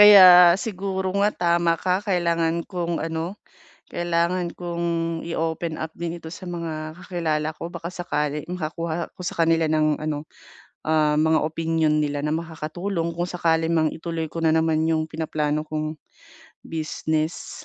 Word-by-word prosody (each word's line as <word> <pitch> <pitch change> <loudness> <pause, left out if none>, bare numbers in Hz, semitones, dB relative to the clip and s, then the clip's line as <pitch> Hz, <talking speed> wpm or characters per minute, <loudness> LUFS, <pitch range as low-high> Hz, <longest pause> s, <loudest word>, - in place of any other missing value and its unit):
Kaya 185 -4 +10
siguro 190 -3 -2
nga, 205 +1 +3 0.3
tama 170 -1 +2
ka. 185 +2 0
Kailangan 170 -3 +1
kong 175 -3 -2
ano, 165 +5 -4 0.5
kailangan 175 +1 0
kong 170 -1 -3 0.4
i-open 165 0 -2
up 160 0 -4
din 170 0 -4
ito 160 -1 -9
sa 180 0 -8
mga 160 -2 -5
kakilala 160 -4 -1
ko 170 - -6
baka 170 0 -6
sakali 150 -4 -2
makakuha 170 -1 -3
ako - - -19
sa 175 - -4
kanila 165 -1 +3
ng 155 -1 +2
ano, 155 -1 -3 0.6
ah, 155 -1 +3
mga 160 0 +3
opinyon 160 -1 +1
nila 145 -1 -1
na 150 - -1
makakatulong 165 +2 -3
kung 175 +1 -2
sakali 165 -2 +1
mang 160 -2 +2
ituloy 165 -1 -4
ko - - -6
na 160 -1 +3
naman 160 0 +2
yung 160 -1 +1
pinaplano 155 -1 -1
kong 155 0 -3 0.7
business. 155 0 -3
165 Hz, 145 wpm, -24 LUFS, 155-175 Hz, 0.7 s, Kaya